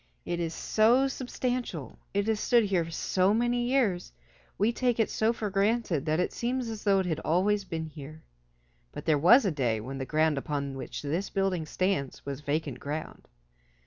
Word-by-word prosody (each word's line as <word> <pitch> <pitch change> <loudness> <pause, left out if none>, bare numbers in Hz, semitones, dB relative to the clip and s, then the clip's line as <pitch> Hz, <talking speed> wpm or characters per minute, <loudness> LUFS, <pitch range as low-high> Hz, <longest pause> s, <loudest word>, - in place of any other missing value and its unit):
It 175 - -2
is 165 -1 -2
so 240 +5 +3
substantial, 245 - -4
it 200 0 0
has 220 -1 0
stood 235 +1 +4
here 180 -5 0
so 185 +4 +1
many 240 +1 +1
years, 230 -9 +1 0.5
we 215 +4 +2
take 245 -1 0
it 225 - +2
so 220 +1 +2
for 220 -3 -4
granted 195 - +1
that 155 +2 +1
it 180 - 0
seems 245 0 -2
as 220 -2 -6
though 200 -2 +4
it - - -3
had 160 -3 -1
always 195 +5 +1
been 160 -3 -4
here. 155 0 -10 0.7
But - - -8
there 155 -3 +3
was 225 - +7
a 195 - +2
day 125 -7 0
when 135 +5 -6
the 130 - -4
ground 155 -2 +2
upon 140 -1 -3
which 135 - -6
this 165 +7 -2
building 190 -5 -1
stands 185 -7 -1
was 140 0 -5
vacant 145 -2 -2
ground. 150 +2 -6
185 Hz, 185 wpm, -29 LUFS, 155-220 Hz, 0.7 s, was